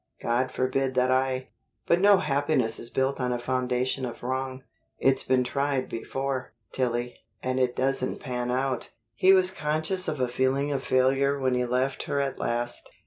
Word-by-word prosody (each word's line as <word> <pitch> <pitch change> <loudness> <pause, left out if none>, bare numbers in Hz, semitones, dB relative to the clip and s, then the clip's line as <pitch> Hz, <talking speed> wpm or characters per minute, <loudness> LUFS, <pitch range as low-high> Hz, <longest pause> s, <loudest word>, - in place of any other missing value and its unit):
God 125 +2 0
forbid 130 +1 0
that 130 0 +3
I 130 0 0 0.4
But 170 +1 +3
no 200 0 +7
happiness 140 -6 +1
is 120 - -6
built 135 +2 0
on 125 0 0
a 120 - 0
foundation 125 +1 -1
of 120 -1 -5
wrong. 130 +1 -3 0.3
It's 135 0 +3
been 130 -1 +2
tried 140 0 -1
before, 130 +1 -3 0.2
Tillie, 120 -1 -2 0.2
and 130 0 0
it 125 -1 +1
doesn't 130 0 0
pan 125 -2 -3
out." 130 0 -1 0.2
He 185 +12 +5
was 185 -1 +5
conscious 160 +2 -1
of 150 - -2
a 125 - +2
feeling 130 +3 0
of 135 -2 -1
failure 135 +2 +2
when 130 -1 +1
he 125 0 +1
left 130 +2 0
her 140 - +1
at 140 -1 -2
last. 120 +1 -2
130 Hz, 175 wpm, -27 LUFS, 125-140 Hz, 0.4 s, no